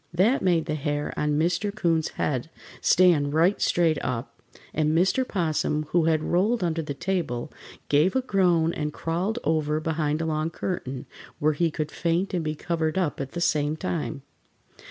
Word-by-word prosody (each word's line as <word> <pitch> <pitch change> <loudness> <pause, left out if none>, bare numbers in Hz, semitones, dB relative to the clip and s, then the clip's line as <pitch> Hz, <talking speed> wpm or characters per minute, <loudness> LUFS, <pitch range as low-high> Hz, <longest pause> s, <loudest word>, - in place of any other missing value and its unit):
That 195 +10 +3
made 175 -4 +2
the 155 - -2
hair 145 0 -2
on 150 0 0
Mr. 175 +6 +1
'Coon's 170 -6 +1
head 135 +1 -1 0.3
stand 160 -6 +4
right 175 +5 +3
straight 165 -3 +2
up, 120 -1 -4 0.3
and 155 +1 +1
Mr. 190 +9 +3
'Possum, 155 -4 0
who 170 -2 +2
had 160 -1 +2
rolled 195 +7 +1
under 165 -1 0
the 150 -2 -5
table, 155 -6 -2 0.3
gave 150 - +3
a 260 - +2
groan 175 -7 +2
and 150 0 -2
crawled 175 +9 -2
over 155 -1 +1
behind 155 -1 -1
a 165 - -1
long 155 0 -1
curtain, 140 -7 -4 0.3
where 155 +1 +2
he 165 +3 +1
could 155 -1 -4
faint 175 +4 -1
and 175 -3 0
be 155 0 -2
covered 160 +1 -1
up 170 -7 0
at 135 -1 -6
the 175 - -3
same 150 -3 +1
time. 160 -5 -3
160 Hz, 175 wpm, -26 LUFS, 150-175 Hz, 0.3 s, stand